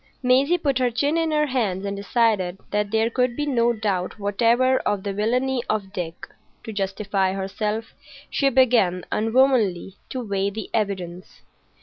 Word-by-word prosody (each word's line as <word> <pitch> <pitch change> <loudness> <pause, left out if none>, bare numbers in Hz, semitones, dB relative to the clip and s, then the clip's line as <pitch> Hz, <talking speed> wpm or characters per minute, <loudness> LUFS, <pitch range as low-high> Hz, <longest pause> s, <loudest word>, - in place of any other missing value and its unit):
Maisie 270 +7 +4
put 280 -6 0
her 250 -1 +2
chin 285 +6 0
in 330 -1 +1
her 300 -1 +2
hands 215 -9 -1
and 200 0 -3
decided 200 -3 +1
that 210 0 0
there 220 +1 +2
could 250 0 +1
be 295 - -2
no 240 -4 +2
doubt 205 -5 -2
whatever 235 +5 +2
of 205 -2 -1
the 200 - -3
villainy 250 +5 0
of 200 -2 -2
Dick. 175 -4 -5 0.4
To 220 - -7
justify 195 -1 -1
herself, 210 +3 -3 0.3
she 275 - +1
began, 230 -9 +3
unwomanly, 225 -5 +2
to 250 -3 -5
weigh 200 0 0
the 215 +2 -7
evidence. 185 -4 -3
220 Hz, 155 wpm, -23 LUFS, 195-255 Hz, 0.4 s, Maisie